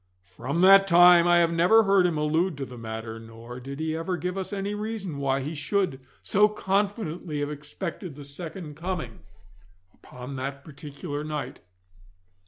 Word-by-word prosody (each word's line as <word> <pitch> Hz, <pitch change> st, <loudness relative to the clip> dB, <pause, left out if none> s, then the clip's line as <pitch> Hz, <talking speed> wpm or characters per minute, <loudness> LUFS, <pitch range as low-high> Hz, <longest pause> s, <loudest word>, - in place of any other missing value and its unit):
From 130 Hz, -, -3 dB
that 195 Hz, +1 st, +7 dB
time 175 Hz, -1 st, +7 dB
I 175 Hz, 0 st, +5 dB
have 170 Hz, -1 st, +3 dB
never 180 Hz, +7 st, +5 dB
heard 195 Hz, -3 st, +4 dB
him 165 Hz, -3 st, -2 dB
allude 160 Hz, +3 st, 0 dB
to 135 Hz, -, -4 dB
the 125 Hz, -, -11 dB
matter, 110 Hz, -1 st, -6 dB
nor 115 Hz, +2 st, -10 dB
did 135 Hz, +3 st, -8 dB
he 160 Hz, 0 st, -2 dB
ever 175 Hz, +3 st, -2 dB
give 180 Hz, +1 st, -3 dB
us 190 Hz, +1 st, -4 dB
any 200 Hz, 0 st, -3 dB
reason 210 Hz, -7 st, -4 dB
why 135 Hz, -1 st, 0 dB
he 150 Hz, +4 st, -4 dB
should 180 Hz, -2 st, -1 dB, 0.2 s
so 210 Hz, +2 st, +4 dB
confidently 195 Hz, -6 st, -2 dB
have 145 Hz, +1 st, -2 dB
expected 150 Hz, +3 st, -6 dB
the 145 Hz, -, -10 dB
second 160 Hz, +2 st, -7 dB
coming 165 Hz, -8 st, -5 dB, 0.7 s
upon 125 Hz, +2 st, -10 dB
that 140 Hz, +1 st, -5 dB
particular 145 Hz, 0 st, -7 dB
night. 150 Hz, -2 st, -5 dB
160 Hz, 165 wpm, -26 LUFS, 140-185 Hz, 0.7 s, that